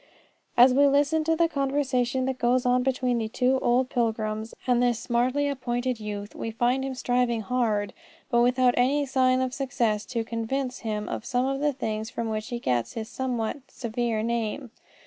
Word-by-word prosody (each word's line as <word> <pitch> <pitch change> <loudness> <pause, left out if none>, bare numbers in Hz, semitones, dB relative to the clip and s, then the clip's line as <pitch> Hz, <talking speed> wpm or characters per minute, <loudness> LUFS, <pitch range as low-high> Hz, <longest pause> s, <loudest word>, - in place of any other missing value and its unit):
As 250 +1 +8
we 285 +2 +5
listen 290 +3 +2
to 325 0 +2
the 335 +1 +3
conversation 270 -3 0
that 260 -1 -2
goes 245 +1 +2
on 250 0 +3
between 255 -2 0
the 220 - -2
two 255 +3 +1
old 250 +2 +2
pilgrims 220 -2 -1
and 245 -1 +3
this 245 -2 +2
smartly 250 +5 0
appointed 250 -3 -2
youth, 205 -1 -6
we 225 - -4
find 245 +4 +1
them 270 -1 -3
striving 245 -2 0
hard, 215 -2 0 0.4
but 235 -1 +4
without 250 0 +3
any 280 +4 +2
sign 255 -1 +2
of 255 -1 -1
success, 235 -6 0
to 230 -2 -2
convince 250 +3 -3
him 210 -2 -3
of - - -4
some 250 0 0
of 270 0 -1
the 295 +1 +2
things 220 -5 -3
from 230 -1 -3
which 215 0 -3
he 245 -2 -3
gets 125 - -1
his 220 -1 -5
somewhat 245 -3 -2
severe 230 -2 -2
name. 235 +2 -2
245 Hz, 185 wpm, -26 LUFS, 225-260 Hz, 0.4 s, As